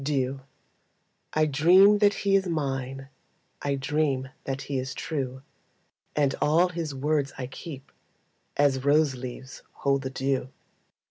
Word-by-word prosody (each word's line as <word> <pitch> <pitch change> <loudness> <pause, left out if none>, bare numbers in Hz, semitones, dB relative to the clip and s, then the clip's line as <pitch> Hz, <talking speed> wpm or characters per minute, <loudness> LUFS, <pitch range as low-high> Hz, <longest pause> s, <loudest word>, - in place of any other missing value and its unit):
Dew 135 -2 -1 0.9
I 155 0 +3
dream 180 +8 +6
that 205 -1 +4
he 195 0 +4
is 195 -1 +2
mine, 135 -4 -3 0.5
I 140 -1 0
dream 135 -1 0 0.2
that 135 0 -3
he 140 -2 -2
is 130 0 -5
true, 130 -4 -4 0.7
And 140 -2 +2
all 170 +4 +4
his 165 -5 -4
words 145 0 0
I 130 - -3
keep 135 +1 -9 0.7
As 135 -2 +3
rose 145 0 +4
leaves 130 +1 -8
hold 140 -1 0
the 130 - -4
dew. 135 -1 -1
140 Hz, 135 wpm, -27 LUFS, 130-155 Hz, 0.9 s, dream